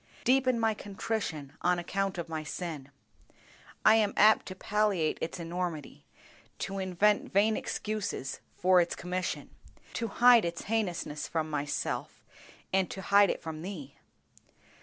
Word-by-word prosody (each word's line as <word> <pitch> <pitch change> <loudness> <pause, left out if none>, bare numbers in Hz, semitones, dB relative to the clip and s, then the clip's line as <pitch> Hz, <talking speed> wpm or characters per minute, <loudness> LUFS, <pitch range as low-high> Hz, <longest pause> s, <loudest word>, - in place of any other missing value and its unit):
Deepen 255 -1 +3
my 225 -1 +2
contrition 200 -8 -4
on 180 0 +2
account 195 +2 -2
of 170 -1 -4
my 160 -1 -4
sin. 155 -4 -5 1.0
I 215 - +8
am 210 -2 +1
apt 215 +2 +5
to 185 - -6
palliate 200 -5 0
its 165 - -4
enormity, 170 -2 -5 0.5
to 195 0 -4
invent 190 +3 +1
vain 210 +3 +3
excuses 210 -13 -3 0.2
for 185 0 +5
its 170 - -1
commission, 180 0 -3 0.4
to 230 - -2
hide 240 +1 +6
its 170 0 -3
heinousness 180 -8 -2
from 160 -1 -2
myself, 145 -1 -3 0.5
and 190 -1 +2
to - - -6
hide 200 -1 +5
it - - -3
from 160 -1 -6
Thee. 160 -7 -7
185 Hz, 140 wpm, -30 LUFS, 165-210 Hz, 1.0 s, I